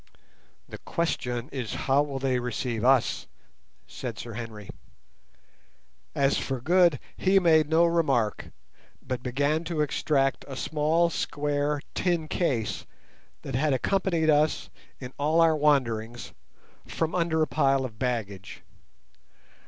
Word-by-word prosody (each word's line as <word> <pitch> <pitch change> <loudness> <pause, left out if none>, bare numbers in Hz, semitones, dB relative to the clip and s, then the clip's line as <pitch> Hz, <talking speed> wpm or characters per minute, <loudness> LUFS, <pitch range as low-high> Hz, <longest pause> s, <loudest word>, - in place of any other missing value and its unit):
"The - - -9
question 125 -7 -2
is 125 -7 -4
how 135 +1 +4
will 145 -2 -3
they 130 -1 0
receive 120 -1 -3
us?" 130 -1 +2 0.6
said 115 -4 -7
Sir 115 +1 -7
Henry. 110 -3 -7 1.5
As 140 0 +2
for 135 -2 -3
Good 170 +1 +3 0.2
he 195 +1 +2
made 160 -5 +4
no 165 +1 +4
remark, 140 -11 +1 0.5
but 125 -2 -5
began 145 +6 0
to 165 -2 -1
extract 135 -1 0
a 135 - -7
small 160 +4 +1
square 145 -1 -1
tin 170 -4 0
case 130 -11 -1 0.6
that 135 - -6
had 140 +3 +1
accompanied 170 +2 +1
us 150 +1 +1 0.3
in 125 -1 -8
all 155 +3 +2
our 165 -1 +5
wanderings 120 -6 0 0.5
from 165 -1 -2
under 165 -3 +1
a - - 0
pile 135 -1 +2
of 110 -4 -9
baggage. 110 -7 -4
140 Hz, 125 wpm, -27 LUFS, 125-160 Hz, 1.5 s, our